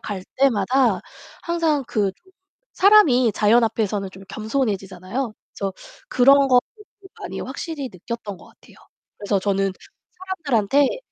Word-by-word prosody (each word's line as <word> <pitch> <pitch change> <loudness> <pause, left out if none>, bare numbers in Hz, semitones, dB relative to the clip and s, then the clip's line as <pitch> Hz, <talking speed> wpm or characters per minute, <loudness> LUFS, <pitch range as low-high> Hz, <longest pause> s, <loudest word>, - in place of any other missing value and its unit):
갈 200 -3 -5
때마다 255 0 +2 0.4
항상 325 -5 0
그 205 -4 0
좀 375 - -28 0.4
사람이 320 - +5
자연 220 +3 +4
앞에서는 205 -3 -2
좀 190 - -13
겸손해지잖아요. 215 -1 -3 0.2
그래서 195 -1 -3 0.4
그런 275 +2 +5
것들을 270 - +1 0.4
많이 - - -6
확실히 305 -6 -5
느꼈던 205 +2 -7
것 - - -17
같아요. - - -21 0.4
그래서 205 -1 -1
저는 195 0 0 0.7
사람들한테 270 - +2
235 Hz, 295 characters per minute, -22 LUFS, 200-275 Hz, 0.7 s, 사람이